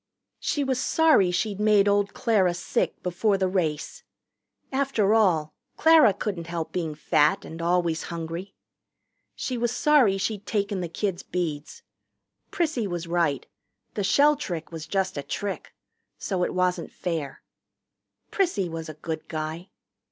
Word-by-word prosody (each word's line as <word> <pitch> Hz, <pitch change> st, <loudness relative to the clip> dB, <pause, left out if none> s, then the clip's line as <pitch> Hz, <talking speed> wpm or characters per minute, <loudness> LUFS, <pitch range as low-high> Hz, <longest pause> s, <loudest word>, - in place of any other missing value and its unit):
She 290 Hz, -, -1 dB
was 260 Hz, -2 st, 0 dB
sorry 310 Hz, -, +4 dB
she'd 195 Hz, +3 st, -1 dB
made 210 Hz, -1 st, +4 dB
old 200 Hz, 0 st, +1 dB
Clara 200 Hz, -7 st, +2 dB
sick 175 Hz, -, -2 dB
before 195 Hz, +3 st, +1 dB
the 190 Hz, -1 st, +1 dB
race. 165 Hz, -5 st, -2 dB, 0.7 s
After 265 Hz, -7 st, +1 dB
all, 170 Hz, -9 st, +2 dB, 0.2 s
Clara 320 Hz, -8 st, +6 dB
couldn't 190 Hz, -4 st, -4 dB
help 170 Hz, -1 st, -4 dB
being 165 Hz, -4 st, -3 dB
fat 150 Hz, 0 st, +2 dB
and 165 Hz, +1 st, -8 dB
always 170 Hz, -2 st, +1 dB
hungry. 170 Hz, +3 st, -6 dB, 0.8 s
She 250 Hz, -2 st, -3 dB
was 240 Hz, 0 st, 0 dB
sorry 245 Hz, -6 st, +4 dB
she'd 205 Hz, +1 st, -3 dB
taken 200 Hz, -2 st, -1 dB
the 175 Hz, -, -4 dB
kids' 185 Hz, +1 st, -2 dB
beads. 155 Hz, -5 st, -4 dB, 0.7 s
Prissy 310 Hz, -, -1 dB
was 175 Hz, -2 st, -4 dB
right 165 Hz, -5 st, 0 dB, 0.5 s
the 205 Hz, -, -2 dB
shell 290 Hz, +9 st, +4 dB
trick 170 Hz, -, -5 dB
was 160 Hz, -2 st, -7 dB
just 190 Hz, -6 st, -1 dB
a -, -, -2 dB
trick. 200 Hz, +7 st, -5 dB, 0.5 s
So 185 Hz, -3 st, -2 dB
it -, -, -2 dB
wasn't 180 Hz, 0 st, 0 dB
fair. 165 Hz, -6 st, -4 dB, 0.9 s
Prissy 350 Hz, -, +1 dB
was 165 Hz, -1 st, -6 dB
a 155 Hz, -, -8 dB
good 160 Hz, +1 st, -5 dB
guy. 160 Hz, +3 st, -5 dB
185 Hz, 145 wpm, -26 LUFS, 165-215 Hz, 0.9 s, Clara